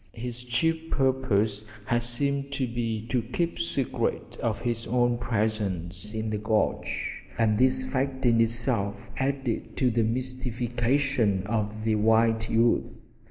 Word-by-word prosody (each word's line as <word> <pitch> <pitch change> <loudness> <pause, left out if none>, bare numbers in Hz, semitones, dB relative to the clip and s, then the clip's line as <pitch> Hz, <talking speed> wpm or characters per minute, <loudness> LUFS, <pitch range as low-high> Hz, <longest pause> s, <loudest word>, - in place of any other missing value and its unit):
His 120 +1 -2
chief 160 +7 0
purpose 110 -6 +1 0.2
had 120 +2 +1
seemed 140 +4 -1
to 135 - 0
be 115 -2 -3
to 125 -2 +1
keep 165 +9 -2
secret 140 -6 -1 0.3
his 120 -1 -1
own 120 -1 +2
presence 105 -4 -2
in 110 0 -2
the 105 - -1
gorge, 110 0 -1 0.2
and 110 -2 +3
this 130 - +3
fact 135 - -2
in 115 -1 +5
itself 115 -3 0
added 135 -3 -2
to 125 -2 +3
the 115 +1 +2
mystification 120 -2 0
of 105 0 -2
the 110 0 +2
white 110 +1 +3
youth. 115 +1 +1
120 Hz, 130 wpm, -27 LUFS, 110-130 Hz, 0.3 s, in